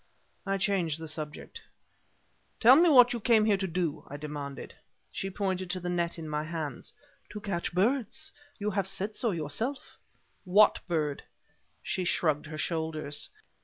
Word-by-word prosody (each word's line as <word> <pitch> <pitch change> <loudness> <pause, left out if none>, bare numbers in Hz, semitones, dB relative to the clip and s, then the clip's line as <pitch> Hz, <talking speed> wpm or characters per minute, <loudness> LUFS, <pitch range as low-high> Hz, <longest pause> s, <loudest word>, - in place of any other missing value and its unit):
I 195 0 +1
changed 185 -6 0
the 160 - -6
subject. 155 -1 -6 1.0
"Tell 245 +3 +8
me 340 +3 +6
what 245 -4 +7
you 240 - -2
came 220 -1 +4
here 210 -2 +3
to 190 0 -2
do," 170 -3 -2
I 145 - -6
demanded. 145 -2 -6 0.4
She 195 - -3
pointed 185 -2 -2
to 185 +1 -1
the 180 0 -4
net 170 -1 -1
in 160 -1 -6
my 150 0 -2
hands. 155 -5 -5 0.4
"To 210 - -6
catch 195 -4 -3
birds; 245 - 0 0.3
you 210 0 -2
have 195 -1 0
said 195 +2 -2
so 235 - +1
yourself." 190 - -3 0.4
"What 205 +3 +5
bird?" 155 -5 -1 0.6
She 185 - -1
shrugged 155 -4 +1
her 155 0 -7
shoulders. 155 -3 -1
180 Hz, 160 wpm, -29 LUFS, 155-210 Hz, 1.0 s, Tell